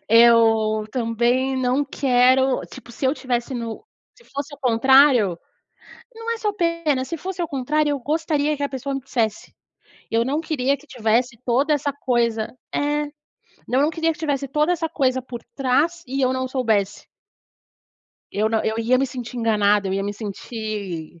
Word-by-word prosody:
eu 225 -2 +5
também 245 +2 +1
não 260 +2 +1
quero 260 -1 +3
tipo, 245 -2 -12
se 270 - -6
eu 265 - +2
tivesse 250 -1 -2
no 230 - -5 0.3
se 480 - -21
fosse 280 -3 -6
ao 285 - -20
contrário 250 - +5 0.8
Não 455 +1 -4
é 465 - -1
só 430 -2 -1
pena. 335 -7 0
Se 335 - -4
fosse 370 +3 -5
ao 340 - -1
contrário, 295 +2 0
eu 285 - -1
gostaria 300 +1 0
que 285 - -3
a 285 - -1
pessoa 270 +1 -4
me 270 - -4
dissesse. 230 -5 -2 0.6
Eu 230 +1 +2
não 280 +5 -1
queria 280 -4 0
que 285 - -20
tivesse 235 -1 0
toda 265 +5 +2
essa 290 -1 0
coisa 235 -5 -1 0.2
É. 295 +1 0 0.6
Não, 255 - +1
eu - - +4
não 300 - +3
queria 325 0 0
que - - -18
tivesse 285 -3 -1
toda 300 +5 +1
essa 325 -2 -1
coisa 260 -4 0
por 245 -2 -8
trás 285 +6 +1
e 270 +2 -2
eu 255 0 +2
não 260 0 -2
soubesse. 225 -7 0 1.3
Eu 215 +2 +1
não 220 0 0
eu 220 +1 -1
ia 240 +3 +2
me 270 - +1
sentir 250 -1 -7
enganada, 210 -3 +2
eu - - -2
ia 195 +1 -1
me 200 +1 -2
sentir 205 -6 -6
260 Hz, 180 wpm, -22 LUFS, 230-290 Hz, 1.3 s, eu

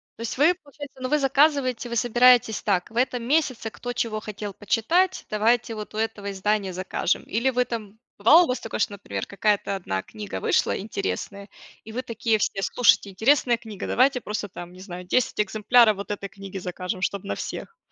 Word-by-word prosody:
То - - -12
есть 230 +2 -4
вы, 320 +6 +5
получается 285 -5 -12
но 255 - -2
вы 300 - +3
заказываете, 270 -3 +2
вы 235 - -3
собираетесь 240 -1 +4
так: 185 -4 0
"В 225 - -17
этом 245 -1 +1
месяце 255 -4 0
кто 245 +2 -6
чего 230 -3 -2
хотел 210 -1 -6
почитать, 285 - +1
давайте 225 +2 +1
вот 210 0 -7
у - - -7
этого 215 -2 -2
издания 195 -1 -1
закажем". 185 0 -1
Или 235 +5 0
вы 250 -1 +1
там 220 -3 -6 0.2
Бывало 315 - +7
у - - -7
вас 250 - -1
такое, 225 - -5
что, 205 - 0
например, 200 - -5
какая-то 200 0 0
1 95 - -3
книга 100 -2 -7
вышла - - +2
интересная 200 - -4 0.3
и 220 - -10
вы 245 +3 -3
такие 230 -2 0
все: 195 -1 -1
"Слушайте, 205 -4 +3
интересная 240 +4 +3
книга, 220 -4 -8
давайте 255 0 +2
просто 210 -2 -4
там, 175 0 -9
не 185 - -14
знаю, 180 -1 -8
10 245 +5 0
экземпляров 215 +1 +4
вот 200 - -7
этой 205 -1 -4
книги 195 0 -9
закажем, 180 +1 -5
чтоб 200 -1 -1
на 100 - -3
всех". - - -7
220 Hz, 195 wpm, -24 LUFS, 200-250 Hz, 0.3 s, Бывало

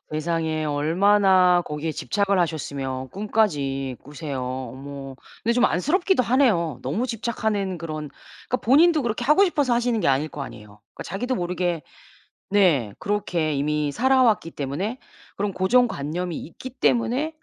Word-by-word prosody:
세상에 160 0 -1
얼마나 180 +4 +4
거기에 150 +2 -4
집착을 200 +3 0
하셨으면 135 -5 -3
꿈까지 145 - -1
꾸세요. 145 -2 -6
어머 130 +2 -6 0.3
근데 235 - +2
좀 245 +1 +3
안쓰럽기도 335 - +2
하네요. 220 - +2
너무 170 - -1
집착하는 215 -5 -2
그런 155 -2 -5 0.4
그러니까 255 - +1
본인도 305 +5 +5
그렇게 235 0 -2
하고 305 +10 +5
싶어서 290 -9 +1
하시는 240 -1 +1
게 - - +1
아닐 140 +3 +1
거 145 - -7
아니에요. 105 -5 -11
그 - - -7
자기도 245 +8 -3
모르게 175 - -2 0.7
네 165 - +3
그렇게 175 -6 -1
이미 150 +1 0
살아왔기 245 - +3
때문에 175 - -4 0.4
그런 200 0 -1
고정관념이 180 - +1
있기 215 +10 -9
때문에 260 +5 0
180 Hz, 350 characters per minute, -24 LUFS, 150-230 Hz, 0.7 s, 본인도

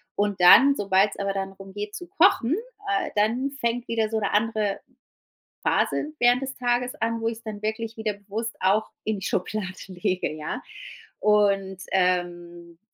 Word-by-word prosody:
Und 205 -2 0
dann, 270 +10 +8
sobald's 200 -1 +2
aber 200 0 -1
dann 195 0 -3
darum 195 0 -13
geht 205 +1 -5
zu 355 - -7
kochen, 315 -7 +3 0.5
äh, - - -4
dann 230 +6 +1
fängt 245 -3 -2
wieder 225 -2 0
so 220 0 -1
'ne 200 - -1
andere 215 -1 0 0.8
Phase 300 - +1
während 245 +1 +4
des 270 0 -5
Tages 245 0 0
an, 230 0 -2
wo 225 - 0
ich's 230 0 -8
dann 215 -2 -7
wirklich 220 +1 -3
wieder 220 -1 -2
bewusst 210 +3 -5
auch 215 +3 +2 0.2
in 215 -2 -1
die 190 - -6
Schublade 195 +1 -2 0.2
lege, 185 -1 -2
ja. 155 - -5 0.6
Und, 200 -2 +2
ähm, 175 -2 -1
210 Hz, 160 wpm, -25 LUFS, 195-230 Hz, 0.8 s, dann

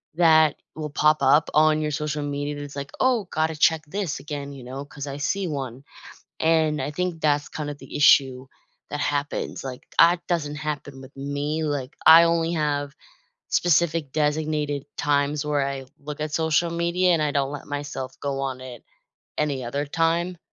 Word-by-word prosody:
that 160 -3 +5 0.2
will 155 -1 -4
pop 155 +1 +3
up 155 +2 +4
on 155 0 +4
your 150 0 -1
social 150 0 -2
media 145 0 -3
that's 145 -1 -8
like, 140 0 -6
"Oh, 245 -6 +2
gotta 160 0 0
check 160 +1 +3
this 185 -2 -3
again," 145 -1 -6
you 135 -2 -10
know, 130 +3 -6
'cause 145 0 -8
I 140 0 -5
see 185 +7 -1
1. 135 -4 -5 0.6
And 160 -2 +2
I 140 - -3
think 180 0 -2
that's 145 -2 +1
kind 150 -2 -5
of 145 - -8
the - - -8
issue 135 -3 +4 0.4
that 150 - -3
happens. 145 0 -2
Like, 130 -2 -7
I 175 +1 +7
doesn't 150 -4 -1
happen 145 -3 -5
with 130 +1 -13
me. 145 +3 -2
Like, 145 -3 -3
I 165 +1 +10
only 165 0 +1
have 145 -2 -1 0.6
specific 165 -3 +2
designated 150 -1 0
times 145 0 +1
where 145 -2 +1
I 135 -1 -5
look 150 +1 -7
at 155 -1 -3
social 160 +1 +2
media, 170 +2 +1
and 165 - +2
I 150 -1 +1
don't 140 -1 0
let 145 -1 -7
myself 145 -2 -5
go 140 -1 -2
on 130 -2 -3
it 125 -2 -9 0.6
any 145 -3 0
other 140 +5 -2
time. 165 +3 0
150 Hz, 180 wpm, -24 LUFS, 140-160 Hz, 0.6 s, I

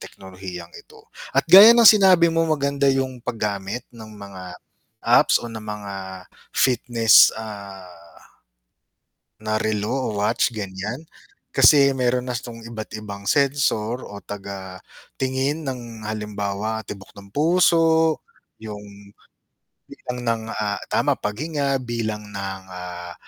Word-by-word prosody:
teknolohiyang 95 -2 -10
ito. - - -15 0.3
At 135 - +3
gaya 200 +7 +10
ng 235 - +5
sinabi 190 -5 +7
mong 165 -1 +1
maganda 140 0 0
yung 130 -2 -2
paggamit 105 -1 -4
ng 110 -2 -11
mga 95 -3 -10 0.5
apps 120 +1 +5
o - - -6
ng 110 -1 -8
mga 105 -2 -7 0.6
fitness, 120 -3 +5
ah, 100 -4 -9 1.6
na 110 0 -2
relo 105 0 -1
o 135 -1 -1 0.2
watch 105 - +1
ganyan. 105 +6 -5 0.5
Kasi 140 -2 +6
meron 125 -1 0
na 125 - -2
tong 115 -1 -10
iba't 110 -2 -8
ibang 100 -1 -9
sensor 130 -4 +1
o 100 - -9
taga 95 -2 -8 0.4
tingin 135 +4 -1
ng 120 -4 -7
halimbawa 105 0 -4
tibok 100 -2 -10
ng 100 0 -13
puso, 160 0 +3 0.4
yung 100 -1 -11 0.7
bilang 125 0 -7
ng, 115 -1 0
ah, 105 -1 -2
tama - - +2
paghinga 140 +5 -2
bilang 110 -3 -4
ng, 95 -1 -5
ah, 90 -1 -8
110 Hz, 120 wpm, -22 LUFS, 100-135 Hz, 1.6 s, gaya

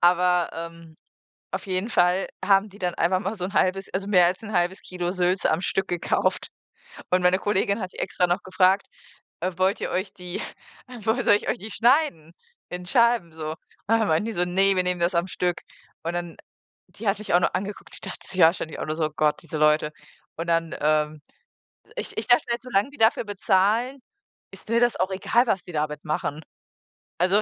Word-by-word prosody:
Aber, 180 0 +3
ähm, 165 -1 -9 0.6
auf - - -4
jeden 185 +5 -1
Fall 180 -1 +2 0.2
haben 195 +1 +3
die 200 - -15
dann 180 -1 -1
einfach 185 +2 +2
mal 200 +2 -3
so 180 -2 -3
'n 195 - -6
halbes 190 +1 +1
also, 195 +1 -2
mehr 180 -4 +5
als 185 +5 -2
'n 215 - -7
halbes 175 +2 +1
Kilo 180 -1 -3
Sülze 185 0 +1
am 165 - 0
Stück 195 0 -1
gekauft 175 -1 -1 0.6
und 180 0 +3
meine 180 +1 +4
Kollegin 205 +1 0
hat 185 - -5
die - - -10
extra 180 - 0
noch 175 +3 0
gefragt, 185 +1 +2 0.5
äh: 185 - 0
„Wollt 190 +2 +1
ihr - - -2
euch 185 +2 -2
die 180 -2 -5 0.5
äh, 245 -4 -10
woll 235 +3 +1
soll 205 - +6
ich - - -2
euch - - 0
die 220 0 -8
schneiden 235 - +2 0.4
in 180 0 -6
Scheiben 235 -4 +2
so?“ 155 -1 -4
Und 160 - -7 0.4
dann 220 - +1
meinten 160 +4 +2
die 230 - -3
so: 180 -1 +1
„Ne, 195 +2 +3
wir 185 - +2
nehmen 180 -1 -1
das 170 +1 +1
am 170 +2 +1
Stück.“ 180 -1 -1 0.4
Und 170 +1 -2
dann 175 -1 -4 0.5
die 225 - -10
hat 200 - +1
mich 215 - -5
auch 175 - +6
noch - - 0
angeguckt. 195 +2 -5
Die - - -8
dachte - - -8
sich 185 - -2
auch - - +10
wahrscheinlich 165 -2 -4 0.2
so: 160 - 0
„Oh 155 - -1
Gott, 155 -1 +1
diese 160 -2 -6
Leute.” 150 0 +3 0.4
Und 165 +1 -5
dann, 165 -1 +1
ähm 150 0 +1 0.8
ich - - -5
ich 220 - -2
dachte 245 0 +5
halt: 235 0 -1
„Solange 250 0 0
die 290 - -15
dafür 225 +1 +3
bezahlen, 210 +6 +1 0.5
ist - - -13
mir 230 - +3
das 240 -1 +3
auch 185 +1 +1
egal, 235 +6 +2
was 195 -5 0
die 180 - -10
damit 150 -1 -3
machen.“ 155 0 -2 0.8
Also, 190 +4 +4
185 Hz, 210 wpm, -25 LUFS, 170-205 Hz, 0.8 s, auch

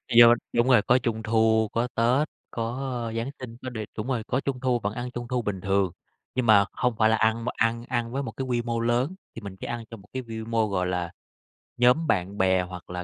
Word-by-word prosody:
Do 120 0 +10 0.2
đúng 120 +2 +3
rồi, 125 -5 +6
có 125 +4 +4
Trung 115 -3 -2
thu, 110 0 +3
có 120 +2 0
Tết, 125 +6 +3 0.2
có, 115 0 -2 0.3
ơ, 115 - -4
Giáng 115 +4 -2
sinh, 120 -2 -8
có 130 - -5
đề 110 -3 -5
đúng 110 +4 -3
rồi, 120 -4 -1
có 130 - +1
Trung 135 -2 -3
thu 125 -2 +1
vẫn 100 0 -2
ăn 125 +1 -5
Trung 120 -1 -6
thu 125 -1 0
bình 100 -4 -3
thường, 95 -2 +1 0.4
nhưng 130 -2 +1
mà 100 -3 +6
hông 125 -2 0
phải 110 0 +4
là 110 - +4
ăn 110 +1 +1
mà - - 0
ăn 115 +1 0
ăn 120 -2 -1
với 140 +2 -2
một - - -5
cái 130 - -4
quy 120 -2 0
mô 115 -1 -2
lớn, 120 +9 +1 0.2
thì 115 - -7
mình 100 -2 -8
chỉ - - -6
ăn 120 -1 -4
trong 115 -4 -10
một 100 - -20
cái 130 - -2
vi 110 -2 -6
mô, 115 -1 +1
gọi 90 -2 -1
là, 90 -2 -2 0.7
nhóm 125 +7 +4
bạn 100 -1 0
bè 95 -1 +3
hoặc 90 -1 -9
là 90 0 -4
115 Hz, 260 wpm, -26 LUFS, 105-125 Hz, 0.7 s, Do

